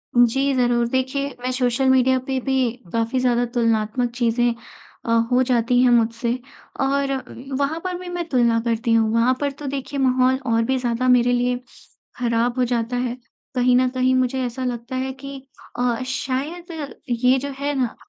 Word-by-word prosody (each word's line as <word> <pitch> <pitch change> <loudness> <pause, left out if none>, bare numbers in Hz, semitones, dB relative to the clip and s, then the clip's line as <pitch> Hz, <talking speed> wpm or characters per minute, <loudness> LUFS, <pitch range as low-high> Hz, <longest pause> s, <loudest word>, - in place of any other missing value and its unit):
जी 270 +4 +3
ज़रूर, 240 -1 +2
देखिए 265 +2 -1
मैं 255 +1 -2
सोशल 255 +1 +1
मीडिया 260 0 +4
पे 265 -1 0
भी 265 -2 +1 0.2
काफ़ी 230 +3 0
ज़्यादा 245 -1 +2
तुलनात्मक 230 0 0
चीजें 240 0 +1 0.5
अ, - - -5 0.2
हो 250 - +4
जाती 245 -1 +2
हैं 250 - +5
मुझसे 230 0 +2 0.5
और 275 0 +1
उ 265 0 -6
वहाँ 285 +3 -1
पर 365 -1 -3
भी 360 0 -9
मैं 350 -1 -4
तुलना 235 -3 +3
करती 230 0 0
हूँ, 225 -1 +3
वहाँ 235 +3 +3
पर 285 -1 0
तो 285 +1 -10
देखिए 275 +1 -4
माहौल 260 0 +3
और 230 0 +3
भी 260 +3 0
ज़्यादा 245 0 -1
मेरे 245 -1 +4
लिए 245 0 +1 0.6
खराब 240 0 0
हो 250 - +3
जाता 240 0 -1
है। 245 0 -2 0.4
कहीं 250 0 +3
न 255 0 +3
कहीं 255 0 +1
मुझे 255 +1 +1
ऐसा 245 +2 -4
लगता 240 +1 -4
है 260 +1 -2
कि 275 0 -7 0.4
अ, 245 -1 0
शायद 275 +6 -3 0.4
ये 250 +2 +3
जो 280 - -4
है 285 +1 -1
ना, 245 -3 -1
250 Hz, 180 wpm, -22 LUFS, 240-265 Hz, 0.6 s, हैं